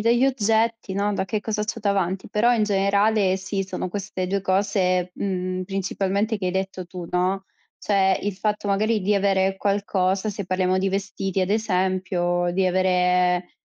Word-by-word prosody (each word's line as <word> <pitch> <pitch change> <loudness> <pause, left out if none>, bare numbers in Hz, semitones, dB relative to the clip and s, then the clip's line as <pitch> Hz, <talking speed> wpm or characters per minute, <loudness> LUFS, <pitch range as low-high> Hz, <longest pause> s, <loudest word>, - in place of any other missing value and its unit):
dagli 235 +3 +3
oggetti, 225 -4 0
no, 205 +1 0
da - - -1
che 215 +3 -2
cosa 210 0 -2
c'ho 215 +2 -3
davanti, 195 -3 -1
però 235 +3 +3
in 220 -3 +2
generale 200 0 +2
sì, 195 +1 -3
sono 190 -1 -4
queste 190 -1 -4
2 195 +2 -1
cose, 185 -2 +1
mhmm, 185 -1 -2
principalmente 195 +3 -1
che 190 - -2
hai - - +1
detto 190 0 -3
tu, 175 -1 -8
no; 185 +2 0 0.3
cioè, 190 -2 +2
il 205 -1 -2
fatto 210 +1 -2
magari 210 +2 +1
di 205 +2 +1
avere 195 -1 +2
qualcosa, 195 0 0
se 200 -1 -4
parliamo 185 0 +1
di 195 - +1
vestiti 195 -1 -2
ad 185 +1 0
esempio, 185 -4 0
di 190 +1 +1
avere, 180 -1 +2
195 Hz, 165 wpm, -23 LUFS, 185-205 Hz, 0.3 s, dagli